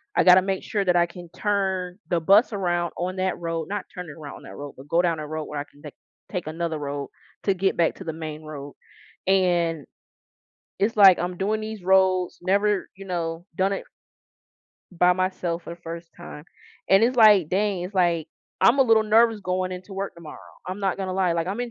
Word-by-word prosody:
I - - +4
gotta 185 0 +8
make 190 0 -2
sure 200 -2 -1
that 180 -1 +3
I 175 0 +4
can 175 0 -11
turn 190 -3 -1
the 175 - +2
bus 205 +7 +5
around 175 -4 -1
on 185 +2 -3
that 185 0 -1
road, 165 -2 -3
not 205 -1 -3
turning 180 -6 -8
around 145 - -8
on - - -15
that - - -11
road, 145 0 -8
but 135 +2 -12
go 165 +3 +3
down 170 -3 0
a 150 - -5
road 155 0 -4
where 150 - -5
I 145 - -4
can 145 - -21
take 150 -2 -10 0.4
take 180 -5 -4
another 165 0 -3
road 140 -1 -4 0.3
to 195 - +2
get 190 +1 0
back 165 -1 +1
to 190 - -10
the 160 - -3
main 155 -1 -6
road. 145 -2 -8 0.5
And 175 -5 +2 0.9
it's, 215 +3 0
like, 195 -3 +8
I'm 180 +1 -3
doing 215 +3 -1
these 215 -3 -6
roads, 185 -1 +2
never, 200 +2 +1
you 195 0 -11
know, 170 -2 -3
done 190 +2 +1
it - - -4 1.1
by 180 +1 +4
myself 180 -2 -2
for - - -8
the 170 - -24
first 170 0 -8
time 160 -3 -10 0.4
and 195 +3 +6
it's, 250 +2 +1
like, 210 -8 +6
dang, 195 0 0
it's, 185 +3 -7
like, 170 -4 +2 0.3
I'm 240 +4 +5
a - - +8
little 225 -3 +4
nervous 225 +1 +4
going 185 -1 -2
into 185 +2 -8
work 195 +1 -4
tomorrow. 170 -3 -11 0.3
I'm 185 +3 -5
not 195 -2 0
gonna 190 -1 -3
lie, 185 -2 +1
like, 165 0 -1
I'm 200 +6 -3
in 245 -1 -3
180 Hz, 215 wpm, -24 LUFS, 165-195 Hz, 1.1 s, gotta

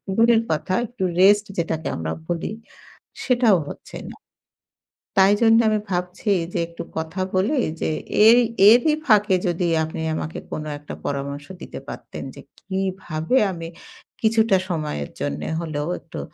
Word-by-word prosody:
দূরের 230 +1 +5
কথা 160 +4 -1
একটু 240 -3 -6 0.2
rest 205 +2 +6
যেটাকে 160 -2 -2
আমরা 80 -1 -3
বলি 175 +3 -2 0.7
সেটাও 240 -7 +4
হচ্ছে - - -10
না। - - -11 1.0
তাই 195 +1 +6
জন্য 225 0 +6
আমি 215 0 +1
ভাবছি 180 +3 -2 0.2
যে - - 0
একটু 170 0 -8
কথা 160 +4 -3
বলি 215 +10 +2 0.2
যে - - 0 0.4
এই 235 +2 +8 0.3
এরই 245 +7 +5
ফাঁকে 210 -4 +4
যদি 175 0 0 0.2
আপনি 160 0 -5
আমাকে 155 0 -4
কোন 155 - -4 0.2
একটা 145 - -9
পরামর্শ 140 0 -3 0.2
দিতে - - -7
পারতেন, - - -8
যে - - -10 0.2
কিভাবে 190 0 -2
আমি 165 -2 -6 0.5
কিছুটা 220 -2 +3
সময়ের 150 - -3
জন্য 70 +1 -2 0.2
হলেও 150 -2 -3
একটু 165 - -9
185 Hz, 140 wpm, -22 LUFS, 160-215 Hz, 1.0 s, এই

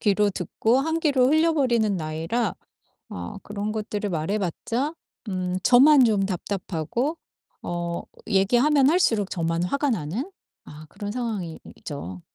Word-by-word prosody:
귀로 205 0 +3
듣고 220 +6 0
한 320 +3 -1
귀로 280 -6 +3
흘려버리는 270 -9 +2
나이라 165 +8 -2 0.5
어 90 -1 -7
그런 205 +1 -4
것들을 210 -1 -3
말해 170 +5 -1
봤자 230 - -2 0.3
음 185 -2 -2
저만 265 +4 +7
좀 210 -4 +2
답답하고 195 - -2 0.5
어 170 0 -3 0.3
얘기하면 245 +8 +4
할수록 225 - +2
저만 165 -1 -1
화가 280 +9 0
나는 220 - -3 0.3
아 150 +1 -11
그런 205 +5 -6
상황이 215 -9 -4 0.2
이죠. 95 - -7
210 Hz, 265 characters per minute, -24 LUFS, 175-255 Hz, 0.5 s, 저만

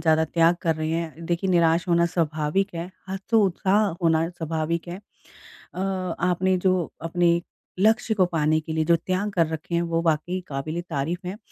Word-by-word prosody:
ज़्यादा 160 -1 +3
त्याग 165 +2 +3
कर 165 -1 +2
रहे 155 0 -2
हैं। 165 0 -3
देखिए 175 +2 0
निराश 170 -1 +3
होना 170 0 +4
स्वाभाविक 165 +3 -1
है 170 +2 -5 0.2
हतोत्साह 195 0 +2 0.2
होना 165 0 +3
स्वाभाविक 165 0 -3
है। 175 - -5 0.8
अ, - - -7 0.4
आपने 180 +1 +2
जो 185 -2 +1
अपने 170 +1 +2 0.4
लक्ष्य 220 +3 +3
को 195 -4 +3
पाने 155 -2 +1
के 160 0 -6
लिए 160 0 0
जो 170 +1 +5
त्याग 185 +5 -2
कर 170 -4 +2
रखे 160 +2 -4
हैं 170 - +2
वो 165 0 +1
वाक़ई 165 +3 0
क़ाबिल-ए-तारीफ़ 160 +3 -3
हैं। 190 +3 -5
170 Hz, 165 wpm, -24 LUFS, 160-180 Hz, 0.8 s, जो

